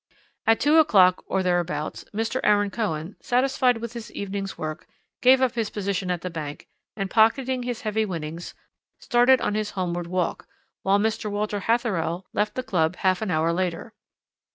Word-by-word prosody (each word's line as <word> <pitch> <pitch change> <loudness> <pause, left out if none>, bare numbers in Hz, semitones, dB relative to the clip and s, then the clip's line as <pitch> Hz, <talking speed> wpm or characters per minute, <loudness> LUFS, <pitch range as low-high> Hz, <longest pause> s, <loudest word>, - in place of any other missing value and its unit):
"At 225 0 +5
two 300 +2 +4
o'clock 185 -11 +5
or 190 -1 0
thereabouts 175 -4 -1
Mr. 225 +4 -2
Aaron 205 -1 +3
Cohen, 185 -6 -3
satisfied 250 -1 +2
with 230 0 -6
his 235 -2 -8
evening's 195 0 -4
work, 155 0 -5 0.3
gave 260 +1 +6
up 255 - +3
his 225 -3 -1
position 195 -2 -2
at 175 -2 -1
the 180 - -5
bank 150 -3 -6 0.3
and, 195 -2 -2
pocketing 250 +5 +2
his 245 -2 -4
heavy 215 0 0
winnings, 170 -3 -5 0.4
started 245 +1 +4
on - - 0
his 215 -1 -1
homeward 175 -2 -2
walk, 180 0 -2 0.3
while 195 +1 +3
Mr. 215 +1 -1
Walter 205 0 -2
Hatherell 190 -6 0
left 210 0 0
the 255 - -2
club 180 -6 0
half 185 +1 +1
an 215 - -2
hour 165 -1 +1
later. 185 +5 -3
205 Hz, 170 wpm, -25 LUFS, 180-225 Hz, 0.4 s, gave